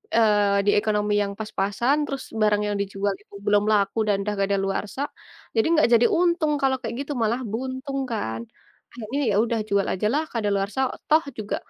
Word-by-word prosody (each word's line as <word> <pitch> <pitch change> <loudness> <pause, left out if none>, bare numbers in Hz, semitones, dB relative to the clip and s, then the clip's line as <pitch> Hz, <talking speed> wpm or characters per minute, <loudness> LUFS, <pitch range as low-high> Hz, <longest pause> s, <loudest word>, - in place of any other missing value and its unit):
eee, 205 -3 +4
di - - +6
ekonomi 210 -1 0
yang 200 -1 -1
pas-pasan 215 +5 0
terus 275 -1 -4 0.2
barang 210 -1 +3
yang 205 - -1
dijual 200 0 -1
itu - - -17
belum 205 0 +3
laku 200 0 +1
dan 200 -1 +1
udah 210 0 -2
kadaluarsa, 195 +5 -1 0.5
jadi 225 +6 +3
enggak 310 - +4
jadi 235 +1 +6
untung 340 -3 +2
kalau 265 -1 +3
kayak 230 -1 -4
gitu 290 - -7
malah 235 +4 0
buntung 260 +3 -4
kan. 115 - -3 0.5
Akhirnya, 240 +4 -4
ya - - +1
udah 230 -1 -1
jual 200 0 +2
aja 210 +3 0
lah 305 +2 +1
kadaluarsa, 205 +1 -1 0.3
toh 315 +1 +6
juga 210 -1 -3
210 Hz, 175 wpm, -24 LUFS, 200-260 Hz, 0.5 s, di